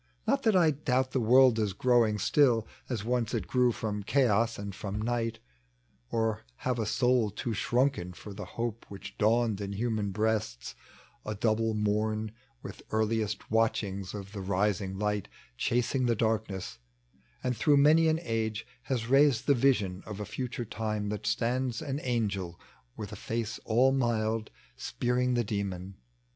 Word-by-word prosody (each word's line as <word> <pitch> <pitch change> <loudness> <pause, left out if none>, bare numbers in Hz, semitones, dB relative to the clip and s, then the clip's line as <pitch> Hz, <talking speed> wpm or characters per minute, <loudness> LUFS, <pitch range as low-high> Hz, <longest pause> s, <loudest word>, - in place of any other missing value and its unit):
Not 275 0 +2
that 220 -6 +3
I 170 -4 +5
doabt 130 -2 0
the 130 - 0
world 125 0 +5
is 105 -3 0
growing 115 -1 +3
still 120 -2 +3 0.2
As 115 -5 -2
once 120 -2 0
it 105 -6 -2
grew 125 +6 +3
from 105 -3 -3
Cha<ra 115 -1 +3
and 100 -1 -5
from 100 +1 -5
Night; 115 0 -1 0.7
Or 110 -2 0 0.2
have 125 -2 0
a 110 - 0
sonl 115 -2 +2
too 120 - -2
shrunken 120 -5 0
for 100 +4 -10
the 105 +1 -7
hope 115 -1 -3
Which 100 -1 -9
dawned 110 -1 +2
in 100 0 -4
human 110 -1 -1
breasts^ 105 - -1 0.5
a 105 - -4
double 110 +1 +1
morn, 105 +1 0 0.3
With - - -8
earliest 110 -1 -1
watchings 100 -4 0
of 100 -1 -7
the 100 -2 -6
rising 95 0 0
light 105 -1 -1 0.3
Chasing 125 - 0
the 120 - +2
darkness; 110 - -2 0.6
and 125 -1 0
through 145 +6 +4
many 155 +3 +6
an 160 0 +2
age 110 -3 -2 0.2
Has 115 -2 -2
raised 135 -2 +4
the 145 - +5
vision 110 -8 +2
of 105 -1 -6
a 105 - -3
future 120 +2 -4
time 105 -1 -3
That 105 -1 -4
stands 120 +3 0
an 140 -2 -3
Ai^el 105 - -2 0.4
with 105 -1 -6
a - - -6
face 115 +2 -3
all 125 +4 +4
mild 115 -4 0 0.3
Spearing 125 - 0
the 120 - +2
demon. 100 -3 -3
110 Hz, 160 wpm, -29 LUFS, 105-125 Hz, 0.7 s, many